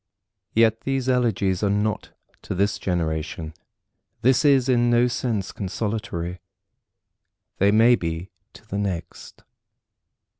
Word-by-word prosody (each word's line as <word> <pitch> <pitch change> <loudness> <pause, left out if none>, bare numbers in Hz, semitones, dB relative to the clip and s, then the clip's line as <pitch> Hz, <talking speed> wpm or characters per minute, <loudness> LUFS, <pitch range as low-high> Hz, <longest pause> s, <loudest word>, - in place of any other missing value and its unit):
Yet 115 0 +3
these 135 -1 -2
elegies 110 -7 +1
are 105 - +1
not 105 +1 -1 0.3
to - - -5
this 100 +2 0
generation, 80 -3 -2 0.7
This 130 +3 +4
is 140 -3 +4
in 120 -2 +3
no 120 0 +4
sense 115 -5 -2
consolatory. 100 -3 -4 1.2
They 100 - +4
may 115 +4 +6
be 85 -3 -2 0.2
to - - -16
the 100 -1 -3
next. 95 -5 -5
105 Hz, 115 wpm, -23 LUFS, 90-120 Hz, 1.2 s, may